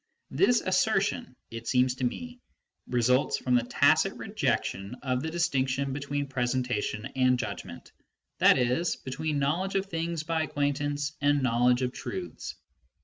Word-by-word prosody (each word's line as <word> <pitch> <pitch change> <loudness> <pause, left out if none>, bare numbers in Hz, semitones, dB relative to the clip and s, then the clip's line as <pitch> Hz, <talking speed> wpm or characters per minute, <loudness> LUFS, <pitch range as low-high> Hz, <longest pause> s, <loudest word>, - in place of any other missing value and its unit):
This 245 -10 +3
assertion, 200 - +1 0.2
it 115 0 -7
seems 125 0 +3
to 130 - -4
me, 245 - -3 0.5
results 125 +2 +2
from 125 - -1
the 120 - +5
tacit 120 - +3
rejection 100 +5 -2
of 130 -2 0
the 160 - -3
distinction 135 -5 0
be 140 - -3
tween 145 0 -2
presentation 125 -4 -1
and 130 -1 +3
judgment, - - -6 0.5
i.e. 125 +5 +4 0.2
between 145 +3 -2
knowledge 165 +8 0
of 195 0 +1
things 165 -3 -3
by 160 0 0
acquaintance 145 0 -1
and 145 -1 +3
knowledge 125 +1 +3
of 125 - 0
truths. 370 -2 -6
135 Hz, 140 wpm, -28 LUFS, 125-160 Hz, 0.5 s, the